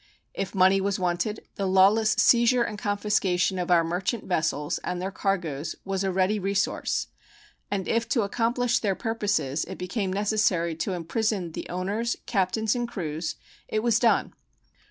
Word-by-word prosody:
If 195 Hz, +1 st, -4 dB
money 190 Hz, +1 st, +5 dB
was 195 Hz, 0 st, 0 dB
wanted, 180 Hz, +4 st, -2 dB
the 195 Hz, -2 st, -1 dB
lawless 195 Hz, +4 st, +5 dB
seizure 235 Hz, 0 st, +4 dB
and 210 Hz, -2 st, -5 dB
confiscation 200 Hz, -3 st, +1 dB
of 180 Hz, -, -3 dB
our 170 Hz, -2 st, +5 dB
merchant 180 Hz, +6 st, -2 dB
vessels 155 Hz, -4 st, -1 dB
and 180 Hz, -, -4 dB
their 190 Hz, +2 st, -3 dB
cargoes 170 Hz, -7 st, -2 dB
was 195 Hz, 0 st, -1 dB
a 190 Hz, -, 0 dB
ready 190 Hz, +3 st, +1 dB
resource, 195 Hz, +1 st, 0 dB, 0.6 s
and 195 Hz, -2 st, -2 dB
if 230 Hz, 0 st, 0 dB
to 240 Hz, -3 st, +2 dB
accomplish 240 Hz, +3 st, +1 dB
their 200 Hz, -3 st, 0 dB
purposes 205 Hz, -, -1 dB
it -, -, -8 dB
became 185 Hz, +2 st, -2 dB
necessary 195 Hz, -4 st, +1 dB
to 185 Hz, +3 st, -2 dB
imprison 180 Hz, +1 st, -1 dB
the -, -, -7 dB
owners, 205 Hz, +6 st, -1 dB
captains, 210 Hz, +1 st, +1 dB
and 240 Hz, -1 st, -1 dB
crews, 160 Hz, -6 st, -4 dB, 0.3 s
it 215 Hz, 0 st, -1 dB
was 230 Hz, -2 st, +3 dB
done. 235 Hz, -1 st, +2 dB
195 Hz, 155 wpm, -26 LUFS, 180-220 Hz, 0.6 s, money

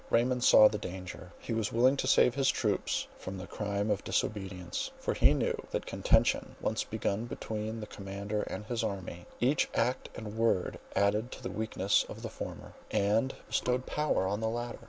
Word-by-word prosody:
Raymond 125 Hz, +1 st, +2 dB
saw 105 Hz, -, +9 dB
the 105 Hz, 0 st, -2 dB
danger; 90 Hz, -1 st, -7 dB
he 115 Hz, -, -5 dB
was 110 Hz, -2 st, 0 dB
willing 125 Hz, +4 st, +4 dB
to 130 Hz, -, -1 dB
save 125 Hz, -2 st, +5 dB
his 135 Hz, 0 st, +2 dB
troops 105 Hz, -5 st, 0 dB
from 95 Hz, +1 st, -6 dB
the 90 Hz, -, -6 dB
crime 100 Hz, +1 st, -2 dB
of 100 Hz, -1 st, 0 dB
disobedience; 95 Hz, -4 st, -2 dB
for -, -, -1 dB
he -, -, +5 dB
knew, -, -, +1 dB
that -, -, -2 dB
contention -, -, +2 dB
once -, -, 0 dB
begun 100 Hz, +4 st, -2 dB
between 110 Hz, -1 st, -4 dB
the -, -, -4 dB
commander 100 Hz, +1 st, -4 dB
and 105 Hz, -, -5 dB
his 115 Hz, 0 st, -2 dB
army, 95 Hz, -4 st, -4 dB
each 135 Hz, +4 st, +2 dB
act 125 Hz, +3 st, 0 dB
and 110 Hz, -1 st, -6 dB
word 110 Hz, -5 st, +1 dB, 0.2 s
added 105 Hz, +4 st, +2 dB
to -, -, -10 dB
the 125 Hz, -, -3 dB
weakness 105 Hz, -2 st, +1 dB
of -, -, -8 dB
the -, -, -3 dB
former, -, -, -7 dB, 0.2 s
and 110 Hz, +6 st, +2 dB
bestowed 125 Hz, +1 st, 0 dB
power 150 Hz, -10 st, +1 dB
on 100 Hz, +2 st, -1 dB
the 110 Hz, 0 st, 0 dB
latter. 120 Hz, +1 st, -4 dB
110 Hz, 185 wpm, -31 LUFS, 100-120 Hz, 0.2 s, saw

